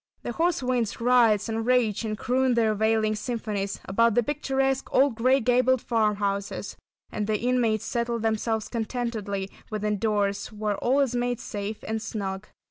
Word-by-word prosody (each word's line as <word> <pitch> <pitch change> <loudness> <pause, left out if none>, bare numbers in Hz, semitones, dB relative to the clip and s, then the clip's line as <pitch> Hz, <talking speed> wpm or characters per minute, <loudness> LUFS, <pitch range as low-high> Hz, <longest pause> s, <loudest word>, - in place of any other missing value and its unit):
The - - -3
hoarse 330 +2 0
winds 245 -4 -1
rise 230 -3 +4
and 225 0 -2
rage 240 -3 +2
and 215 -1 -3
croon 255 +1 +1
their 225 -2 +3
wailing 220 0 +2
symphonies 210 -3 -3
about 230 +3 +2
the 240 - +4
picturesque 270 0 -1
old 270 0 +4
gray 255 +4 +3
gabled 250 +1 +3
farmhouses, 205 -4 -1 0.4
and 210 -1 -3
the 215 -1 +1
inmates 235 -3 +1
settle 235 -1 -1
themselves 220 0 -1
contentedly 220 -4 -3 0.2
within 210 -1 -1
doors 205 -2 0
where 210 -1 -2
all 265 +4 +2
is 265 -3 +1
made 245 -1 -1
safe 205 +1 -5
and 220 0 -2
snug. 195 -2 -4
225 Hz, 155 wpm, -26 LUFS, 210-245 Hz, 0.4 s, rise